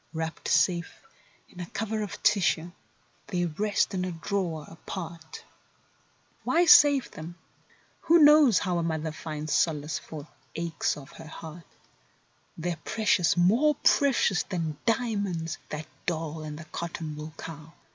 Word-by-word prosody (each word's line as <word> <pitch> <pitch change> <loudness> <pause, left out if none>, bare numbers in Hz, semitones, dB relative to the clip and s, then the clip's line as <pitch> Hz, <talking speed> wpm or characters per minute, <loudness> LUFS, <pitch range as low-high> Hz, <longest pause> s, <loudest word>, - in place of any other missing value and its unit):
Wrapped 160 0 -4
safe 170 -3 +1 0.4
in - - -15
a 175 - -5
cover 220 +2 -3
of 205 - -6
tissue, 175 -4 +2 0.6
they 175 -3 -1
rest 205 +7 0
in 185 -1 -1
a 185 - -2
drawer 170 -2 -3
apart; 165 -1 -8 1.0
Why 345 +2 +3
save 290 -4 +7
them? 160 +3 -9 0.7
Who 335 +1 +6
blows 295 -7 +7
how 175 -3 0
mother 160 -1 -2
finds 155 0 -5
solace 150 -2 0
for 155 -1 -9 0.3
aches 170 -2 -1
of 135 -2 -11
heart? 160 +1 -10 0.9
They're 170 0 -3
precious; 210 -6 +2
more 235 +13 +4
precious 265 -9 +3
than 165 -6 -4
dia¬ 230 -3 +1
monds, 170 -4 -3
that 155 0 -5 0.2
doll 160 -2 -2
and 150 -1 -6
the 160 - -9
cotton¬ 160 -1 -5
wool 155 +1 -8
cow. 160 -1 -9
170 Hz, 135 wpm, -27 LUFS, 160-200 Hz, 1.0 s, save